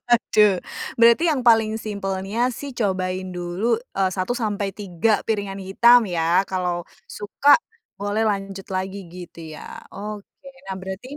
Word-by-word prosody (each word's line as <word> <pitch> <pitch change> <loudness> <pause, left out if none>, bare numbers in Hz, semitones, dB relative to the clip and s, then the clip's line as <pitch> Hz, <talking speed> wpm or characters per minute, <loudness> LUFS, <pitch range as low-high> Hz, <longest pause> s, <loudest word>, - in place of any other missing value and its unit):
Waduh, 210 -5 +4 0.4
berarti 235 +7 +5
yang 270 -4 0
paling 225 -2 +4
simpelnya 200 +2 -2
sih 285 +2 -7
cobain 185 -5 -2
dulu, 180 +7 -1 0.2
eee, 190 -1 +2
1 185 +4 -3
sampai 205 -4 -2
3 205 +2 0
piringan 200 -3 -2
hitam 230 +5 +5
ya, 175 +2 +1
kalau 180 -2 -2 0.2
suka 245 +8 +3 0.4
boleh 205 +2 -1
lanjut 195 -2 -2
lagi 190 0 -4
gitu 175 -1 -10 0.2
ya, - - -9
oke. 210 0 -7 0.4
Nah - - -2
berarti 190 +9 -7
200 Hz, 135 wpm, -22 LUFS, 185-225 Hz, 0.4 s, berarti